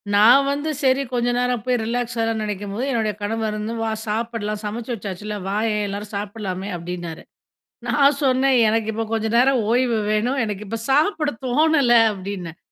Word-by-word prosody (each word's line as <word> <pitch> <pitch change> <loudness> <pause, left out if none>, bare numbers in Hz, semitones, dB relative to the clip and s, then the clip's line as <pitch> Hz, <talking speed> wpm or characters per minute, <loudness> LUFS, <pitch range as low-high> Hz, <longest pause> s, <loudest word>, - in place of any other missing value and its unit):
நான் 240 +7 +7
வந்து 290 +2 -2
சரி, 260 +1 +3
கொஞ்ச 245 0 +1
நேரம் 250 -3 0
போய் 250 -1 +2
ரிலாக்ஸ் 245 +1 -2
ஆகலாம்ன்னு 225 -1 0
நினைக்கும்போது, 205 +4 -4
என்னுடைய 220 -4 0
கணவர் 215 0 -2
வந்து 220 +2 -3
"வா 225 0 -1 0.2
சாப்பிடலாம். 215 -1 -2
சமைச்சு 225 +4 -4
வச்சாச்சுல்ல, 210 0 -5
வாயேன், 210 0 0
எல்லாரும் 205 +1 -6
சாப்பிடலாமே" 200 -1 -4
அப்படின்னாரு. 175 -1 -6 0.6
நான் 280 0 +4
சொன்னேன் 260 0 +3
"எனக்கு 220 0 0
இப்ப 225 +1 -2
கொஞ்ச 220 0 0
நேரம் 260 0 +4
ஓய்வு 245 -2 +2
வேணும். 240 +6 +1
எனக்கு 210 0 -5
இப்ப 230 +3 -4
சாப்பிட 300 +2 +2 0.2
தோணல" 285 -1 +3 0.2
அப்படின்னேன். 185 -3 -6
225 Hz, 155 wpm, -22 LUFS, 205-250 Hz, 0.6 s, நான்